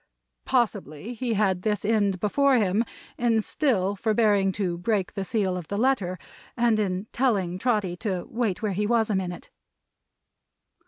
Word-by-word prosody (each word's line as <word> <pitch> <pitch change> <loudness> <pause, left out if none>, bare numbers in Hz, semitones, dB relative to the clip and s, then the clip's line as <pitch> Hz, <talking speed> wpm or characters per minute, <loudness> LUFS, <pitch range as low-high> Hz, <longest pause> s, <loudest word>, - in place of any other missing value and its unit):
Possibly 215 - -1
he 235 -1 -2
had 195 -3 +1
this 210 0 -1
end 205 -3 +2
before 275 +7 +3
him 205 0 +2 0.4
in 235 -2 +3
still 205 -10 0
forbearing 210 -2 +2
to 180 -4 -2
break 195 -1 0
the 195 - -3
seal 195 -2 0
of 175 -3 -6
the 200 - -3
letter, 210 -7 +1 0.4
and 235 -2 +3
in 190 -1 -1
telling 195 -9 +1
Trotty 210 -6 0
to 185 -3 -3
wait 225 -4 -2
where 210 - 0
he 205 +3 0
was 225 -1 +2
a - - +1
minute. 180 -2 -4
210 Hz, 155 wpm, -26 LUFS, 185-230 Hz, 0.4 s, before